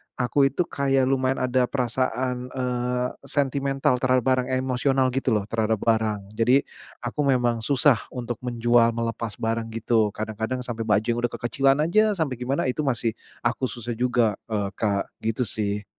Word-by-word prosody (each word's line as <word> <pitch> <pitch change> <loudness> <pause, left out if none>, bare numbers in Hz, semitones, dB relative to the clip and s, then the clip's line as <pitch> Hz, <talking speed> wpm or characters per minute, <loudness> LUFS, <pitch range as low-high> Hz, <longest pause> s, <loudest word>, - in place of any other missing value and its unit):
aku 135 +2 +2
itu 140 - 0
kayak 135 -4 +1
lumayan 130 -1 +1
ada 125 0 +2
perasaan, 125 0 -1
eee, 125 -1 -1 0.2
sentimental 135 -1 +1
terhadap 130 -1 +2
barang, 130 0 +2
emosional 130 0 +1
gitu 130 -3 0
loh 105 - 0
terhadap 110 -1 +1
barang. 110 -2 +1 0.2
Jadi, 125 +4 +4 0.4
aku 120 +5 -5
memang 120 -3 +2
susah 130 +1 +3 0.2
untuk 120 -2 -4
menjual, 120 -1 +3
melepas 115 -2 -3
barang 115 0 -1
gitu, 115 -1 +2
kadang-kadang 110 +4 -3
sampai 115 -2 -4
baju 105 0 +3
yang 120 0 0
udah 120 -1 0
kekecilan 135 +3 +2
aja 215 +6 +3
sampai 155 -6 0
gimana 130 +3 -1
itu 125 - -11
masih 120 -3 +1 0.3
aku 120 +2 0
susah 120 -1 -6
juga, 120 -3 +1
eee, 100 -2 -1
Kak, 100 -2 0 0.2
gitu 115 +3 0
sih. 105 -1 -2
125 Hz, 160 wpm, -24 LUFS, 115-130 Hz, 0.4 s, Jadi